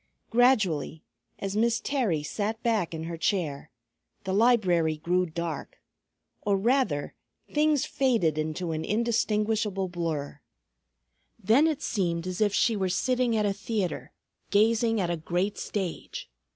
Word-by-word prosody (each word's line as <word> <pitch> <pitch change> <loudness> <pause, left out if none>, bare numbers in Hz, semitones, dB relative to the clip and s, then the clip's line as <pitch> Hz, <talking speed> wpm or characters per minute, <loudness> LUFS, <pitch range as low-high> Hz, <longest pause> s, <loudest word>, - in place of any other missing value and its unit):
Gradually, 215 - +2 0.3
as 195 0 -4
Miss 235 +2 +2
Terry 225 - 0
sat 215 +7 -3
back 220 -7 +1
in 160 -1 -5
her 165 0 -5
chair, 160 -5 -1 0.5
the 190 -1 -2
library 185 -8 +3
grew 180 +3 +1
dark; 165 -2 -5 0.6
or 200 -1 +1
rather, 230 - +1 0.4
things 300 -2 +3
faded 230 - +1
into 155 +3 -2
an 160 0 -2
indistinguishable 215 -3 0
blur. 155 -5 -4 1.0
Then 230 +9 +4
it 310 -2 -2
seemed 170 -5 -1
as 185 +2 -4
if 210 -1 +4
she 225 +3 +2
were 190 -2 0
sitting 245 +5 +1
at 210 - +1
a 200 - +1
theatre 200 -2 -3 0.4
gazing 225 +2 +3
at 175 -3 0
a 170 - -1
great 180 +5 -2
stage. 190 -5 -5
200 Hz, 135 wpm, -27 LUFS, 170-225 Hz, 1.0 s, Then